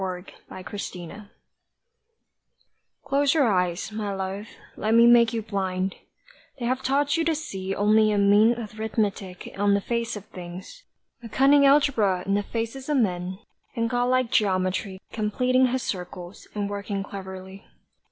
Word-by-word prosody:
A 185 -1 -4 0.2
SPIRITUAL 185 0 -7
WOMAN 200 +4 -10 1.7
CLOSE 280 +1 +2
your 285 -6 +4
eyes, 180 +2 -1
my 210 -1 -3
love, 195 +2 -4 0.3
let 220 +1 +1
me 230 0 +7
make 235 -1 +6
you 230 -2 -3
blind; 190 -2 -2 0.6
They 245 - -4
have 255 +2 0
taught 285 +3 +1
you 330 - +1
to 325 -1 +1
see 195 -10 -4
Only 215 +1 +4
a 205 - +1
mean 205 +3 +5
arithmetic 215 -4 -3
on 200 0 +3
the - - +2
face 235 +1 -2
of 210 -1 -8
things, 185 - -10 0.4
A 230 - -9
cunning 280 +2 +5
algebra 230 -10 +3
in 195 - 0
the 205 - +2
faces 230 +6 -5
of 295 - +2
men, 185 -5 -1 0.4
And 230 -1 -1
God 245 0 +1
like 255 -1 +1
geometry 190 -1 0
Completing 250 +4 +2
his 255 0 -1
circles, 180 -1 -6
and 205 -1 -1
working 200 0 -4
cleverly. 190 0 -9
210 Hz, 150 wpm, -25 LUFS, 190-240 Hz, 1.7 s, me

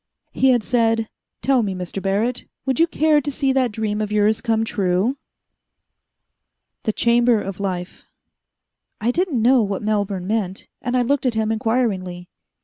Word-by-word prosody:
He 265 - +3
had 245 -3 +3
said, 225 -2 +1 0.3
"Tell 265 -2 +3
me, 200 -4 -2
Mr. 180 +1 -5
Barrett, 210 +6 -1 0.2
would 265 -2 0
you 330 - +5
care 310 -2 +3
to 290 - -3
see 275 -1 0
that 260 -3 +1
dream 210 0 -2
of 210 -1 -3
yours 210 +1 +2
come 225 -1 +1
true?" 195 +6 0 1.7
The 215 - +2
Chamber 235 +1 +3
of 195 -2 -6
Life 185 -2 -4 0.9
I 230 +3 +1
didn't 340 -3 0
know 250 +1 +5
what 200 -1 -2
Melbourne 200 -3 -1
meant, 195 -2 -2
and 245 +1 -1
I 250 - +3
looked 275 +1 +1
at 240 - 0
him 220 0 0
inquiringly. 210 -6 -1
225 Hz, 160 wpm, -21 LUFS, 200-250 Hz, 1.7 s, you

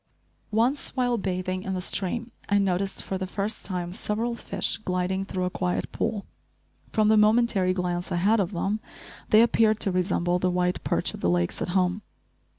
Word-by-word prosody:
Once 235 +6 +1
while 245 -2 +2
bathing 185 -2 -2
in 190 0 -3
the - - -2
stream, 215 +6 -2 0.2
I 205 - +4
noticed, 195 0 0
for 190 - -3
the 190 - -3
first 205 +3 -3
time, 180 -2 -3
several 225 +3 -2
fish 235 - -2
gliding 185 -2 -1
through 185 -2 -3
a 180 - -1
quiet 180 -1 -2
pool. 205 -3 -2 0.7
From 215 -2 +3
the 220 - +5
momentary 210 -3 +4
glance 180 0 -2
I - - +1
had 205 +6 +3
of 195 -1 0
them 200 +3 -1 0.5
they 215 - +7
appeared 225 -2 +3
to 195 - +1
resemble 180 -1 +1
the 185 - +1
white 180 0 0
perch - - 0
of - - -8
the 85 - +1
lakes 85 0 0
at - - -2
home. 180 +2 +1
190 Hz, 185 wpm, -26 LUFS, 180-215 Hz, 0.7 s, they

